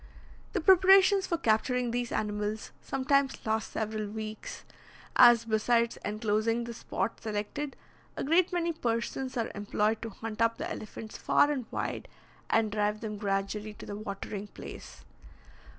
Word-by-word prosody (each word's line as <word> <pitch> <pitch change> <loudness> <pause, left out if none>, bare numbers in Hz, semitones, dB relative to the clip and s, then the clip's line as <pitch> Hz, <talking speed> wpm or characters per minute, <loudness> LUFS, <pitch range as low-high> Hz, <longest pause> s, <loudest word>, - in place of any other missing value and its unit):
The 385 - 0
preparations 380 +2 +6
for 340 - 0
capturing 245 -1 +1
these 240 0 -2
animals 210 0 -2
sometimes 270 +1 +1
last 220 0 -1
several 215 -1 -2
weeks, 215 +1 -7 0.5
as, 240 -1 +7
besides 230 +1 +2
enclosing 215 +2 0
the 235 0 -6
spot 220 -2 -3
selected, 220 +7 -3 0.4
a - - -2
great 335 +6 +3
many 340 -1 0
persons 245 -1 -2
are 230 - -1
employed 210 +1 0
to 230 - -4
hunt 220 +1 -6
up 230 0 +3
the 320 - -3
elephants 215 -8 -7
far 290 - +4
and 260 -6 -3
wide, - - -3 0.4
and 220 -2 +2
drive 210 0 0
them 215 -2 -4
gradually 205 +1 -2
to - - -10
the 205 - -6
watering 205 0 -5
place. - - -10
225 Hz, 145 wpm, -30 LUFS, 210-260 Hz, 0.5 s, as